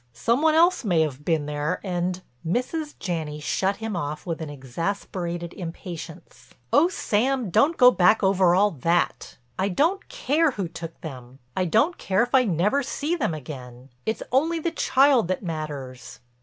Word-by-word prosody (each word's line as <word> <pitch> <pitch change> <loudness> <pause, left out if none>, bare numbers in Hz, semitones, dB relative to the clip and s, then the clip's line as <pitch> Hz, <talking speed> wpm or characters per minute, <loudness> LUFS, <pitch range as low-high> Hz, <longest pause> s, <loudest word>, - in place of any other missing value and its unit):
Some 235 - +1
one 315 0 +4
else 345 +1 +4
may 175 -7 +2
have 145 -3 -2
been 160 -2 0
there 150 +4 -2
and—" 180 -1 -2 0.2
Mrs. 275 - -2
Janney 160 -5 -3
shut 190 +6 0
him 220 -1 -4
off 150 -3 -4
with 165 -2 -4
an 155 - -5
exasperated 170 +5 -4
impatience: 170 -1 -9 0.2
"Oh, 300 +4 +6
Sam, 250 - 0
don't 310 - +3
go 250 -1 +8
back 215 +1 +4
over 190 -2 +4
all 205 +2 +4
that. 170 +3 -1 0.2
I 195 - +1
don't 325 - 0
care 325 - +1
who 195 -6 -3
took 165 0 -8
them; 130 -4 -9 0.2
I 185 - +1
don't 225 - +2
care 195 +3 +2
if 245 - -5
I 260 -2 +5
never 200 - +1
see 290 +5 -2
them 255 - -1
again. 130 -3 -9
It's 220 - -2
only 315 +7 +2
the 330 +1 -2
child 270 - +3
that 185 +3 -2
matters." 140 -7 -6
185 Hz, 170 wpm, -24 LUFS, 160-250 Hz, 0.2 s, go